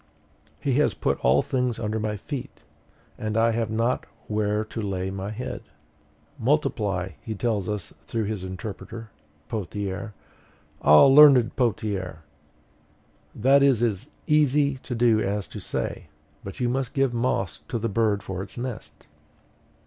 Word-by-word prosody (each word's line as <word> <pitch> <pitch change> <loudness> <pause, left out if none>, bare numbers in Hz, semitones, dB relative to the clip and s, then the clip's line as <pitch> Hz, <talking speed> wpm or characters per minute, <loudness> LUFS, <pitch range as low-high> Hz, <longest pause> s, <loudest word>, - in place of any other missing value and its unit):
HE 135 - 0
HAS 150 - +2
PUT - - 0
ALL 65 +3 +3
THINGS 125 -3 -1
UNDER 110 0 -2
MY 105 -1 -2
FEET, 135 +5 -7 0.6
and 110 0 -2
I 115 +1 +4
have 115 -1 -1
not 115 +3 0 0.2
where 105 0 0
to 110 +1 -5
lay 95 -2 -2
my 95 +1 -4
head! 120 +4 -5 0.8
MULTIPLY, 100 - 0
he 110 - -5
tells 105 -3 -1
us 105 -6 -4
through 115 -1 -1
his 105 -2 -3
interpreter, 110 +4 -7 0.4
Pothier. 100 +1 -4 0.7
Ah, 75 - +8
learned 135 -4 +7
Pothier! 100 - -1 1.1
that 135 +5 +4
is 135 -4 +4
as 115 +3 -1 0.2
easy 145 -2 +3
to 125 - -5
do 115 -2 +4
as 100 -1 -1
to - - -9
say; 90 - -4 0.4
but 95 - -8
you 125 - +1
must 125 0 -2
give 135 -3 +2
moss 115 -7 -1
to 120 - -2
the 115 +1 -1
bird 105 -2 +1
for 95 -1 -4
its 100 +3 -8
nest. 120 -2 -7
110 Hz, 145 wpm, -25 LUFS, 100-125 Hz, 1.1 s, Ah